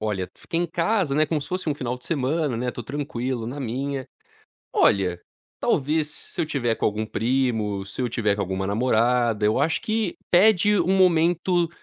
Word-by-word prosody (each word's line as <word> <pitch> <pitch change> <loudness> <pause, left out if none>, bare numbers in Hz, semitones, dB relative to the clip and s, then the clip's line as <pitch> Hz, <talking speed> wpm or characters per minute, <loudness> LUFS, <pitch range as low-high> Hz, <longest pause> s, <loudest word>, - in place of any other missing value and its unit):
Olha, 100 -4 -2
fiquei 165 - -3
em 175 - 0
casa, 175 -2 0
né, 155 +2 +4
como 155 0 -1
se 140 - -7
fosse 185 -2 -3
um 150 - +1
final 125 -3 -3
de 125 - -12
semana, 145 -2 0
né, 125 +2 -2
estou 120 -2 -5
tranquilo 130 -4 -3
na 135 +5 -5
minha. 135 +2 -3 0.7
Olha, 90 -3 +2 0.4
talvez, 150 +2 +1
se - - -7
eu - - +2
estiver 125 -7 0
com - - 0
algum 105 +1 -1
primo, 110 -5 0
se 100 - -6
eu 125 - +1
estiver 110 -3 0
com - - -3
alguma 95 0 -2
namorada, 115 +1 +2
eu 105 +1 +2
acho 160 - +1
que 215 -4 -1 0.2
pede 205 +2 +5
um 180 +3 +2
momento 175 -1 +3
135 Hz, 190 wpm, -24 LUFS, 115-165 Hz, 0.7 s, pede